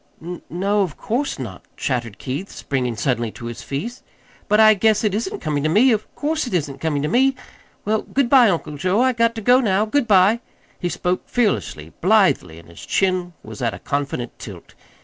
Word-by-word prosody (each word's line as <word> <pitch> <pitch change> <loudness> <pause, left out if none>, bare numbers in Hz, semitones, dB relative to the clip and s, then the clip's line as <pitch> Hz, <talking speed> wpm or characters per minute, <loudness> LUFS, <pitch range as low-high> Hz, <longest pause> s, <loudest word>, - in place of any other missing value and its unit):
"N 175 +2 -7
no, 200 +4 0
of 180 -6 -2
course 270 +5 -2
not," 110 -9 -7 0.2
chattered 120 -5 -2
Keith, 145 +9 -5
springing 125 -4 -3
suddenly 120 0 -1
to 120 - -9
his 120 -1 -6
feet. 230 - -5 0.5
"But 210 - +3
I 215 0 +8
guess 215 +1 +2
it 210 -3 +1
isn't 380 - -3
coming 145 -2 -1
to 155 - 0
me 230 +10 +5
of 215 -2 0
course't 300 -5 -2
isn't 145 -5 -2
coming 150 -3 -1
to - - 0
me! 265 +9 +3 0.5
Well, 215 +1 +1
good 275 -2 0
bye, 245 -3 +6
Uncle 160 -5 -2
Joe, 185 +7 +1
I 260 0 +3
got 230 0 +1
to 225 - -5
go 245 +4 +5
now. 210 -4 +2
Good 250 +3 0
bye!" 200 +2 +5 0.4
He 175 - -2
spoke 180 +1 -2
fearlessly, 195 - -1
blithely, 185 - +3
and 85 - -14
his 85 - -13
chin 185 -2 0
was - - -9
at 115 -4 -1
a - - -8
confident 140 -3 -3
tilt. - - -10
190 Hz, 200 wpm, -21 LUFS, 140-225 Hz, 0.5 s, I